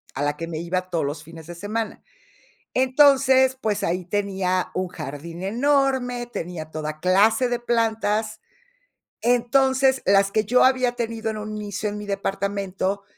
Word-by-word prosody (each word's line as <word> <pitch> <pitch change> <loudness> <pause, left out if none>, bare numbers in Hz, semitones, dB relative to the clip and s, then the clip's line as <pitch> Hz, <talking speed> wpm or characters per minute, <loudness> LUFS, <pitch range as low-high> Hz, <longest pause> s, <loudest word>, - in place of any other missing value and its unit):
a 140 - -2
la 145 0 0
que 165 - -5
me 160 -2 -5
iba 185 +2 -2
todos 165 -5 -1
los 145 +2 -4
fines 165 0 -12
de 175 - -8
semana. 215 +4 -4 0.7
Entonces, 265 0 +4
pues 215 -2 -1
ahí 180 +1 -1
tenía 190 -1 -1
un 185 0 -1
jardín 165 +2 -7
enorme, 250 +1 +1
tenía 165 -8 -6
toda 155 0 -5
clase 220 +7 +3
de 240 -1 -1
plantas. 220 -2 0 0.8
Entonces, 265 +2 +3
las 195 0 +4
que 215 0 +1
yo 250 +4 +4
había 255 -2 +3
tenido 230 -2 -3
en 215 - -4
un 215 0 -5
inicio 205 0 -3
en 205 - -5
mi 210 - -6
departamento, 195 0 -2
205 Hz, 155 wpm, -23 LUFS, 180-240 Hz, 0.8 s, Entonces